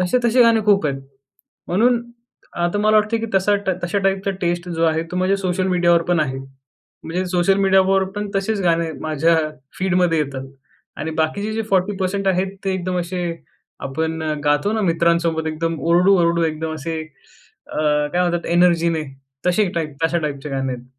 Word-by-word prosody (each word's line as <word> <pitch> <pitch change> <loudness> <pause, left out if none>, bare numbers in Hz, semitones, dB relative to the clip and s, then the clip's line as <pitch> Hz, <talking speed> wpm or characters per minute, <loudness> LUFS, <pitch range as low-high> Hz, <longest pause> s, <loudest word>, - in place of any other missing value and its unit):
तसे-तसे 240 +6 +3
गाणे 230 -1 +4
खूप 200 -6 +4
आहेत, 135 -1 -2 0.7
म्हणून 235 +6 +3 0.6
आता 175 +4 0
मला 215 +1 +3
वाटते 215 +2 +2
की 230 - -3
तसा 195 +2 +3 0.3
तशा 185 +4 0
टाईपचा 195 0 +1
टेस्ट 175 +1 -1
जो 165 -1 -1
आहे 160 0 +1
तो - - -2
माझ्या 185 +2 +2
सोशल 185 -1 -1
मीडियावर 175 -2 +3
पण 175 -2 +3
आहे. 135 -3 -1 0.7
म्हणजे 180 +3 -2
सोशल 180 +2 +2
मीडियावर 190 0 +3
पण 210 0 -3
तसेच 200 +1 -1
गाणे 165 -1 +1
माझ्या 160 +1 +2 0.4
फीडमध्ये 180 -3 +2
येतात 135 -2 -3 0.5
आणि 160 - -4
बाकीचे 200 +7 -2
जे 225 - -1
40% 195 0 0
आहेत 190 +1 0
ते 195 - 0
एकदम 185 0 -2
असे 180 +1 -4 0.7
आपण 160 +3 -2 0.2
गातो 145 +8 +2
ना 220 - 0
मित्रांसोबत 170 -1 +1
एकदम 165 +1 -2
ओरडू-ओरडू 170 0 +3
एकदम 160 0 -2
असे 160 +2 -4 0.6
अ, - - -8 0.4
काय 180 - +1
म्हणतात 175 -1 -1
एनर्जीने 170 -2 +3 0.4
तसे 180 +2 +2
टाइप 155 -4 -3
तशा 170 +1 +2
टाइपचे 150 -2 -4
गाणे 135 -1 -2
आहेत. 125 -1 -8
175 Hz, 160 wpm, -20 LUFS, 160-195 Hz, 0.7 s, गाणे